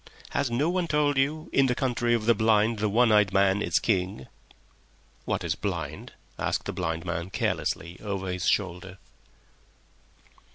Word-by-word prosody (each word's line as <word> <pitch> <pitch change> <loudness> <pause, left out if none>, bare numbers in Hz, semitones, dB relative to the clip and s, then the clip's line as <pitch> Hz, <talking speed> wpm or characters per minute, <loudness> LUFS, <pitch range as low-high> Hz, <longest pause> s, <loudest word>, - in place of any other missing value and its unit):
"Has 140 -3 0
no 125 +6 +1
one 180 0 0
told 145 -3 +2
you, 155 +4 0
'In 135 -1 +4
the 125 - 0
Country 120 -2 +1
of 110 -2 -2
the 115 - +5
Blind 110 0 +2
the 105 0 +1
One 115 +2 +4
Eyed 105 -2 +4
Man 95 +1 +3
is - - +1
King?'" 95 - -1 1.0
"What - - -1
is - - 0
blind?" - - -5 0.3
asked - - -1
the - - -3
blind 80 +1 -3
man, 85 0 -3
carelessly, 85 -2 -2
over 100 -3 -4
his 90 -1 -2
shoulder. 95 -1 -2
105 Hz, 160 wpm, -27 LUFS, 95-125 Hz, 1.0 s, the